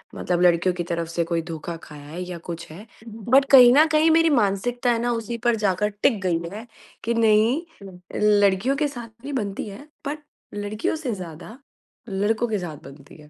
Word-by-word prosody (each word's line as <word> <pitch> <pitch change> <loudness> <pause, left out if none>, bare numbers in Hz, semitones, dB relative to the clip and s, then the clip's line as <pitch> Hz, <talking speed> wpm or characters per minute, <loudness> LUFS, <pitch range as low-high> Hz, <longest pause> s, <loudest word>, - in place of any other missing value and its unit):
मतलब 175 -1 -1
लड़कियों 175 +1 +3
की 175 - -2
तरफ 170 -1 -3
से 170 0 -1
कोई 165 0 -1
धोखा 165 0 -6
खाया 145 -1 -12
है 170 +4 -7
या 180 -1 -6
कुछ 170 -1 -6
है 200 +7 -11 0.4
बट 270 +2 +6
कहीं 250 -3 +9
न 305 +3 +6
कहीं 310 +1 +4
मेरी 330 0 +4
मानसिकता 240 0 +1
है 230 - 0
ना 240 - 0
उसी 230 0 -4
पर 240 -1 +4
जाकर 210 0 0
टिक 215 -7 +3
गई 175 -3 +1
है, 220 +3 -8 0.4
कि 235 - 0
नहीं 225 +5 +3 0.8
लड़कियों 200 +6 +2
के 300 - +1
साथ 240 -5 -8
भी 285 +1 -5
बनती 205 -7 -3
है 200 - -10 0.3
बट 300 +2 -4 0.4
लड़कियों 205 +6 -2
से 265 -7 -3
ज़्यादा 180 +5 -9 0.5
लड़कों 210 +4 0
के 215 - 0
साथ 165 -4 -6
बनती 140 +1 -14
है, 150 - -17
210 Hz, 195 wpm, -23 LUFS, 175-240 Hz, 0.8 s, कहीं